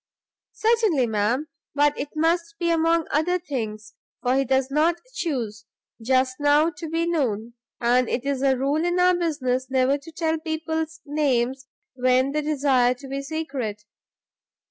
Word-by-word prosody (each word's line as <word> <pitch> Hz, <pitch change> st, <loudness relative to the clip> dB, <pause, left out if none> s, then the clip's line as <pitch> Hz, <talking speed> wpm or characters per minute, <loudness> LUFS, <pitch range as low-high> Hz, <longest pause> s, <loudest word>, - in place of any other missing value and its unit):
"Certainly, 440 Hz, -, +2 dB
ma'am; 225 Hz, +6 st, 0 dB, 0.3 s
but 290 Hz, 0 st, +3 dB
it 280 Hz, -, -4 dB
must 330 Hz, +1 st, +1 dB
be 340 Hz, -1 st, 0 dB
among 330 Hz, 0 st, +2 dB
other 330 Hz, +5 st, +2 dB
things, 220 Hz, -10 st, -5 dB, 0.3 s
for 250 Hz, 0 st, +2 dB
he 270 Hz, -, +3 dB
does 265 Hz, +1 st, +1 dB
not 315 Hz, +4 st, +3 dB, 0.2 s
chuse, 230 Hz, -, -3 dB, 0.3 s
just 255 Hz, +2 st, +1 dB
now 295 Hz, +3 st, +4 dB
to 315 Hz, +1 st, -8 dB
be 330 Hz, +1 st, 0 dB
known; 240 Hz, -9 st, -1 dB, 0.3 s
and 245 Hz, +1 st, +2 dB
it 255 Hz, -, -2 dB
is 280 Hz, -2 st, -1 dB
a 270 Hz, -1 st, +3 dB
rule 280 Hz, +5 st, 0 dB
in 350 Hz, +1 st, 0 dB
our 360 Hz, 0 st, +5 dB
business 260 Hz, -7 st, -1 dB
never 265 Hz, +2 st, +2 dB
to 300 Hz, +4 st, -12 dB
tell 320 Hz, 0 st, -1 dB
people's 320 Hz, 0 st, -3 dB
names 265 Hz, -3 st, 0 dB, 0.3 s
when 255 Hz, +1 st, +2 dB
they 300 Hz, +1 st, 0 dB
desire 270 Hz, -4 st, +2 dB
to 270 Hz, +2 st, -11 dB
be 275 Hz, +1 st, -3 dB
secret. 275 Hz, -8 st, -4 dB
280 Hz, 155 wpm, -24 LUFS, 255-320 Hz, 0.3 s, our